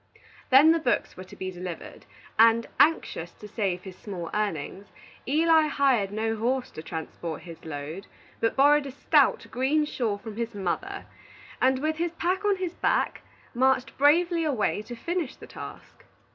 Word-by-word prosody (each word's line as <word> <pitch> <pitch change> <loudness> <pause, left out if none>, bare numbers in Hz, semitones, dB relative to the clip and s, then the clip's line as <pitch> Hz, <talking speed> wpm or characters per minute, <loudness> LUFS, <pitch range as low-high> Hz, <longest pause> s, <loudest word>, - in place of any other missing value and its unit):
Then 275 +5 +8
the 330 - +3
books 250 -6 0
were 185 - -8
to - - -13
be 185 0 -5
delivered, 180 -2 -8 0.3
and, 230 +1 +6
anxious 175 - +2
to 210 - -12
save 195 -4 -2
his 190 -2 -9
small 180 -5 -7
earnings, 200 -1 -3 0.4
Eli 315 +2 +4
hired 265 -9 +2
no 225 +1 -1
horse 250 +4 -1
to - - -8
transport 160 0 -6
his 170 -2 -11
load, 155 +5 -6 0.3
but 225 - +1
borrowed 290 +1 +5
a - - -6
stout, 265 - +3
green 285 +5 +1
shawl 230 -8 -2
from 215 +1 -9
his 230 -1 -3
mother, 290 - -3 0.6
and, 260 0 +4
with 310 +3 -1
his 340 0 -1
pack 360 +4 -1
on 410 -1 +3
his 370 -2 -4
back, - - 0 0.3
marched 260 +1 +2
bravely 335 +4 +4
away 255 -8 0
to 240 +3 -8
finish 335 +3 -3
his - - -12
task. - - -10
240 Hz, 165 wpm, -27 LUFS, 195-305 Hz, 0.6 s, Then